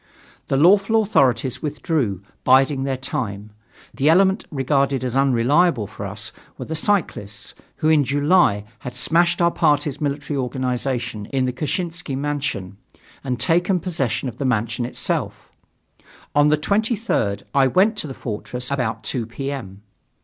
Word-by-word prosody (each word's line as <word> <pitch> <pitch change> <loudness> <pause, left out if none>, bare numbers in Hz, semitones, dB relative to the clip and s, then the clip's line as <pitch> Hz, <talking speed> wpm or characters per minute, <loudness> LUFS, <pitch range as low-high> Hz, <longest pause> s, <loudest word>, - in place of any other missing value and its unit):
The 135 - +1
lawful 195 +8 +5
authorities 130 - +1
withdrew, 145 - -2 0.2
biding 135 +1 +4
their 135 -1 -1
time. 105 -5 -4 0.4
The 140 +3 +2
element 190 +4 +4
regarded 135 -2 0
as 125 -1 -2
unreliable 135 +1 +3
for - - -7
us - - -6 0.3
were - - -6
the 160 - -5
cyclists, 155 - -1 0.2
who 155 - 0
in 155 -2 +5
July 145 - +3 0.2
had 125 -1 -7
smashed 170 +7 +2
our 170 - +4
party's 145 -3 +1
military 145 0 -2
organization 125 -4 -2
in 130 0 0
the 125 - -2
Kshessinsky 165 +1 -3
mansion 140 -10 -3 0.5
and 125 -2 -2
taken 175 - +2
possession 140 - -2
of 120 -2 -6
the - - -1
mansion 120 -1 0
itself. 125 - -3 0.8
On 145 +1 +4
the 150 +1 +3
23rd, 205 - 0
I 135 -1 +4
went 195 - +3
to 160 - -2
the 135 - -7
Fortress 125 +3 -5
about 115 -5 -2
2 115 +1 -3
P. 135 +4 -5
M. 100 -8 -7
135 Hz, 145 wpm, -21 LUFS, 125-160 Hz, 0.8 s, lawful